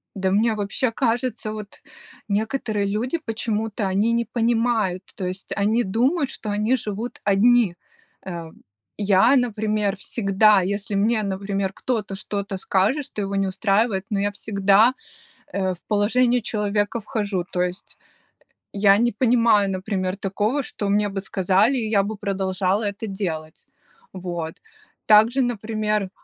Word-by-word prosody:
Да 190 Hz, -1 st, 0 dB
мне 220 Hz, +3 st, +3 dB
вообще 210 Hz, +4 st, -1 dB
кажется, 235 Hz, -1 st, -1 dB
вот 210 Hz, -2 st, -9 dB, 0.5 s
некоторые 215 Hz, 0 st, -1 dB
люди, 225 Hz, +10 st, -1 dB
почему-то 220 Hz, -2 st, -2 dB
они 205 Hz, +5 st, +1 dB
не 235 Hz, 0 st, +1 dB
понимают, 230 Hz, -6 st, 0 dB
то 190 Hz, -, -4 dB
есть 185 Hz, +2 st, -5 dB
они 220 Hz, +4 st, +2 dB
думают, 265 Hz, -, +1 dB
что 215 Hz, -, -6 dB
они 210 Hz, +5 st, +1 dB
живут 220 Hz, 0 st, -5 dB
одни. 210 Hz, 0 st, +4 dB, 0.5 s
Э, 170 Hz, -3 st, -6 dB, 0.5 s
я, 205 Hz, +5 st, +4 dB
например, 215 Hz, -4 st, 0 dB
всегда, 200 Hz, -1 st, +3 dB
если 200 Hz, +2 st, -3 dB
мне, 215 Hz, +2 st, +2 dB
например, 195 Hz, 0 st, -2 dB
кто-то 215 Hz, -6 st, -3 dB
что-то 200 Hz, -1 st, -4 dB
скажет, 200 Hz, +10 st, +1 dB
что 215 Hz, -7 st, -6 dB
его 200 Hz, 0 st, -3 dB
не 195 Hz, 0 st, +1 dB
устраивает, 195 Hz, +1 st, +1 dB
но 205 Hz, -, -1 dB
я 205 Hz, +1 st, 0 dB
всегда, 205 Hz, +3 st, +3 dB, 0.6 s
э, 190 Hz, -2 st, -1 dB
в -, -, -15 dB
положение 240 Hz, +4 st, +2 dB
человека 210 Hz, +1 st, -1 dB
вхожу, 205 Hz, -5 st, -2 dB
то 180 Hz, -, +1 dB
есть 180 Hz, +1 st, -5 dB, 0.7 s
я 200 Hz, 0 st, +5 dB
не 240 Hz, 0 st, +2 dB
понимаю, 230 Hz, -3 st, +3 dB
например, 185 Hz, 0 st, -2 dB
такого, 205 Hz, +8 st, -1 dB
что 205 Hz, -5 st, -4 dB
мне 205 Hz, +1 st, +2 dB
бы 195 Hz, 0 st, -4 dB
сказали, 195 Hz, +6 st, +2 dB
и 225 Hz, -3 st, -1 dB
я 200 Hz, -2 st, +4 dB
бы 220 Hz, +1 st, -4 dB
продолжала 195 Hz, 0 st, -1 dB
это 205 Hz, +2 st, -4 dB
делать. 160 Hz, -6 st, -5 dB, 0.5 s
Вот, 175 Hz, -3 st, -5 dB, 0.5 s
также, 225 Hz, +5 st, +5 dB
например 215 Hz, -3 st, -1 dB
205 Hz, 140 wpm, -23 LUFS, 195-225 Hz, 0.7 s, я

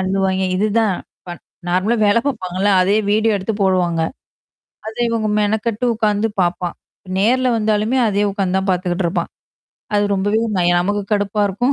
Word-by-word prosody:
அள்ளுவாய்ங்க. 190 Hz, 0 st, 0 dB
இதுதான். 215 Hz, 0 st, +1 dB, 0.3 s
ப -, -, -11 dB, 0.4 s
நார்மலா 190 Hz, +7 st, +1 dB
வேல 205 Hz, +3 st, +4 dB
பாப்பாங்கல்ல. 195 Hz, -5 st, -1 dB
அதயே 200 Hz, +4 st, +3 dB
வீடியோ 220 Hz, 0 st, +2 dB
எடுத்து 200 Hz, +3 st, -3 dB
போடுவாங்க. 180 Hz, -3 st, +1 dB, 0.9 s
அத 220 Hz, -, -6 dB
இவங்க 225 Hz, -2 st, -1 dB
மெனக்கட்டு 220 Hz, +3 st, -1 dB
உட்கார்ந்து 215 Hz, -1 st, +1 dB
பாப்பான். 175 Hz, 0 st, -1 dB, 0.4 s
நேர்ல 255 Hz, +5 st, +2 dB
வந்தாலுமே 215 Hz, +3 st, +1 dB
அதே 205 Hz, 0 st, +1 dB
உட்கார்ந்து 190 Hz, -2 st, -1 dB
தான் 190 Hz, 0 st, -3 dB
பார்த்துக்கிட்டுருப்பான். 180 Hz, 0 st, -1 dB, 0.7 s
அது 205 Hz, 0 st, +3 dB
ரொம்பவே 205 Hz, +3 st, +1 dB, 0.2 s
நய 175 Hz, 0 st, +3 dB
நமக்கு 205 Hz, +3 st, -1 dB
கடுப்பா 205 Hz, 0 st, 0 dB
இருக்கும். 245 Hz, +8 st, 0 dB
205 Hz, 140 wpm, -18 LUFS, 185-220 Hz, 0.9 s, வேல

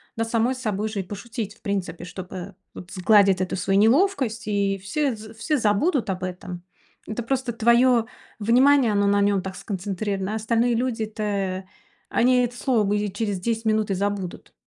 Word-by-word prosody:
над 225 Hz, 0 st, -2 dB
самой 235 Hz, +3 st, +1 dB
собой 215 Hz, -4 st, -2 dB
же 210 Hz, -2 st, -3 dB
и -, -, -7 dB
пошутить, 210 Hz, +2 st, -6 dB
в -, -, -27 dB
принципе, 195 Hz, -5 st, -3 dB
чтоб, 180 Hz, +1 st, -8 dB
э, 185 Hz, +1 st, -7 dB, 0.2 s
вот 180 Hz, -, -10 dB
сгладить 195 Hz, 0 st, +4 dB
эту 185 Hz, -, -1 dB
свою 195 Hz, +1 st, +1 dB
неловкость. 245 Hz, -, +2 dB
И 200 Hz, -1 st, +1 dB
все 245 Hz, +8 st, -1 dB
з 215 Hz, +1 st, -11 dB
все 295 Hz, +7 st, -1 dB
забудут 235 Hz, -, +1 dB
об 185 Hz, -1 st, -3 dB
этом. 180 Hz, -1 st, -6 dB, 0.4 s
Это 220 Hz, +2 st, -4 dB
просто 255 Hz, 0 st, -1 dB
твое 235 Hz, +1 st, +4 dB, 0.3 s
внимание, 250 Hz, +3 st, +4 dB
оно 205 Hz, -1 st, +2 dB
на 200 Hz, 0 st, +3 dB
нём 200 Hz, -1 st, +2 dB
так 190 Hz, 0 st, -6 dB
сконцентрировано, 195 Hz, +1 st, -3 dB
а -, -, -1 dB
остальные 230 Hz, +2 st, +1 dB
люди-то, 215 Hz, -5 st, -2 dB, 0.5 s
они 250 Hz, +1 st, +3 dB
это 245 Hz, 0 st, -3 dB
слово 220 Hz, -6 st, +1 dB
и 205 Hz, -1 st, -1 dB
через 205 Hz, -2 st, -2 dB
10 225 Hz, +3 st, -2 dB
минут 215 Hz, -1 st, +1 dB
и -, -, +2 dB
забудут. 195 Hz, -1 st, -3 dB
215 Hz, 175 wpm, -24 LUFS, 195-235 Hz, 0.5 s, сгладить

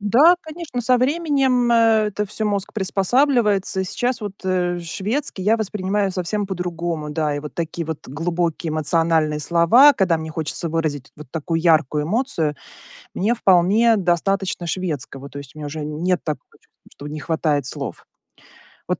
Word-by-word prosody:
Да, 270 Hz, -, +5 dB
конечно, 315 Hz, -5 st, -6 dB
со 250 Hz, +1 st, +3 dB
временем, 270 Hz, -4 st, +2 dB
э, 225 Hz, -2 st, +4 dB
это 210 Hz, +1 st, -3 dB
всё 215 Hz, +2 st, -4 dB
мозг 200 Hz, -1 st, -2 dB
приспосабливается. 205 Hz, 0 st, +1 dB
Сейчас 245 Hz, +5 st, -2 dB
вот, 205 Hz, -2 st, -5 dB
э, 180 Hz, -1 st, 0 dB
шведский 205 Hz, -, -3 dB
я 215 Hz, +4 st, +3 dB
воспринимаю 205 Hz, -2 st, -1 dB
совсем 195 Hz, +3 st, -2 dB
по-другому. 170 Hz, -4 st, -3 dB
Да, 150 Hz, -1 st, -1 dB
и 145 Hz, -, -3 dB
вот 150 Hz, 0 st, -9 dB
такие 170 Hz, -1 st, -4 dB
вот 160 Hz, -2 st, -6 dB
глубокие 165 Hz, +3 st, -2 dB
эмоциональные 155 Hz, 0 st, +1 dB
слова, 170 Hz, -, +6 dB
когда 185 Hz, -5 st, +2 dB
мне 160 Hz, 0 st, -6 dB
хочется 160 Hz, +2 st, -3 dB
выразить 155 Hz, -4 st, -2 dB
вот 150 Hz, -3 st, -11 dB
такую 165 Hz, +1 st, -2 dB
яркую 155 Hz, -3 st, +3 dB
эмоцию, 170 Hz, -, -1 dB, 0.6 s
мне 225 Hz, +6 st, +1 dB
вполне 205 Hz, +5 st, +4 dB
достаточно 185 Hz, 0 st, 0 dB
шведского. 145 Hz, -6 st, -4 dB
То 140 Hz, -, -8 dB
есть 140 Hz, -2 st, -11 dB
мне 155 Hz, -1 st, -8 dB
уже 150 Hz, +1 st, -5 dB
нет 170 Hz, +4 st, -1 dB
такого 155 Hz, -2 st, -4 dB
чувства, -, -, -27 dB
что 145 Hz, -, -9 dB
не 150 Hz, +1 st, -6 dB
хватает 150 Hz, -3 st, 0 dB
слов. 140 Hz, -1 st, -6 dB, 0.8 s
Вот -, -, -1 dB
180 Hz, 155 wpm, -21 LUFS, 155-215 Hz, 0.8 s, слова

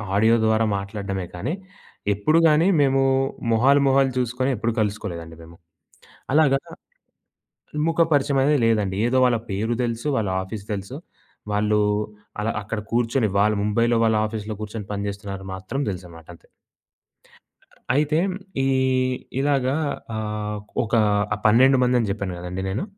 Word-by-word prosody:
Audio 110 Hz, +3 st, +4 dB
ద్వారా 110 Hz, 0 st, +3 dB
మాట్లాడడమే 100 Hz, -2 st, -4 dB
కానీ, 125 Hz, -, -3 dB, 0.6 s
ఎప్పుడుగాని 155 Hz, -, +3 dB
మేము 135 Hz, -1 st, +3 dB, 0.5 s
మొహాలు 135 Hz, +5 st, +4 dB
మొహాలు 135 Hz, 0 st, +3 dB
చూసుకొని 125 Hz, +2 st, 0 dB
ఎప్పుడు 110 Hz, +1 st, -1 dB
కలుసుకోలేదండి 85 Hz, -6 st, -3 dB
మేము. 85 Hz, +1 st, -14 dB, 0.8 s
అలాగా, 140 Hz, -3 st, +4 dB, 1.3 s
ముఖపరిచయమనేది 145 Hz, -3 st, +2 dB
లేదండి. 105 Hz, -4 st, +1 dB
ఏదో 130 Hz, +1 st, +1 dB
వాళ్ళ 120 Hz, -2 st, +3 dB
పేరు 110 Hz, +5 st, -1 dB
దెలుసు. 115 Hz, +4 st, -3 dB
వాళ్ళ 105 Hz, -4 st, 0 dB
ఆఫీస్ 100 Hz, +1 st, -7 dB
దెలుసు. 100 Hz, +7 st, -6 dB, 0.6 s
వాళ్ళు, 105 Hz, +1 st, +2 dB, 0.6 s
అలా 110 Hz, +2 st, 0 dB
అక్కడ 110 Hz, +1 st, -4 dB
కూర్చొని 120 Hz, -1 st, +1 dB
వాళ్ళు 105 Hz, 0 st, +3 dB
ముంబైలో 115 Hz, +2 st, +2 dB
వాళ్ళ 110 Hz, -1 st, +3 dB
ఆఫీస్‌‌లో 110 Hz, -1 st, -5 dB
కూర్చొని 105 Hz, -1 st, -6 dB
పనిజేస్తున్నారు 100 Hz, -1 st, -5 dB
మాత్రం 95 Hz, +9 st, -5 dB
దెలుసనమాట 85 Hz, -3 st, -10 dB
అంతే. -, -, -25 dB, 1.4 s
అయితే 150 Hz, +2 st, +2 dB, 0.5 s
ఈ -, -, +1 dB, 0.7 s
ఇలాగా 135 Hz, -1 st, +1 dB, 0.4 s
ఆహ్, 105 Hz, -1 st, -3 dB, 0.3 s
ఒక 110 Hz, -, -7 dB, 0.4 s
ఆహ్, 105 Hz, -, -4 dB
12 130 Hz, +5 st, +6 dB
మందని 125 Hz, -3 st, +2 dB
జెప్పాను 100 Hz, -2 st, -3 dB
గదండీ 90 Hz, +2 st, -5 dB
నేను. 100 Hz, -, -2 dB
110 Hz, 120 wpm, -23 LUFS, 100-130 Hz, 1.4 s, 12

